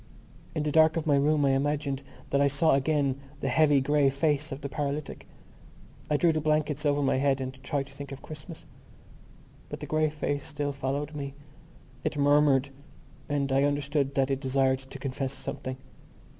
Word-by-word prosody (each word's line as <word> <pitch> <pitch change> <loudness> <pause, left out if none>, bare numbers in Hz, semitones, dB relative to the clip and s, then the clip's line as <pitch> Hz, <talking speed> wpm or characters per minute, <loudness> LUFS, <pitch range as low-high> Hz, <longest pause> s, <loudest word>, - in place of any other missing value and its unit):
In 155 - 0
the 150 - 0
dark 160 +1 +5
of 165 - -1
my 145 -2 +4
room 145 +1 +3
I 135 - +4
imagined 140 0 0 0.3
that 140 - +3
I 140 - +5
saw 145 +3 +3
again 140 -1 +1 0.2
the 135 - -1
heavy 145 +1 +4
grey 145 0 +3
face 150 +2 0
of 135 +2 -5
the 140 - -3
paralytic. 145 +1 -4 0.8
I 150 - +3
drew 170 +2 +4
the 155 -1 -1
blankets 150 -1 +1
over 145 0 +2
my 135 - +2
head 135 0 +2
and 130 0 -6
tried 140 0 -2
to 135 - -14
think 140 0 -8
of 135 - -8
Christmas. 150 -3 -9 1.0
But - - -6
the - - -6
grey 155 0 +1
face 145 -2 -2
still 145 -2 -3
followed 140 +2 -3
me. 140 -2 -5 0.7
It - - -2
murmured; 145 -1 +4 0.6
and 140 -2 0
I 135 +1 +3
understood 145 -1 0
that 135 0 +2
it 135 - 0
desired 130 -1 +2
to 135 +1 -10
confess 135 0 -3
something. 135 -1 -5
140 Hz, 185 wpm, -28 LUFS, 135-150 Hz, 1.0 s, dark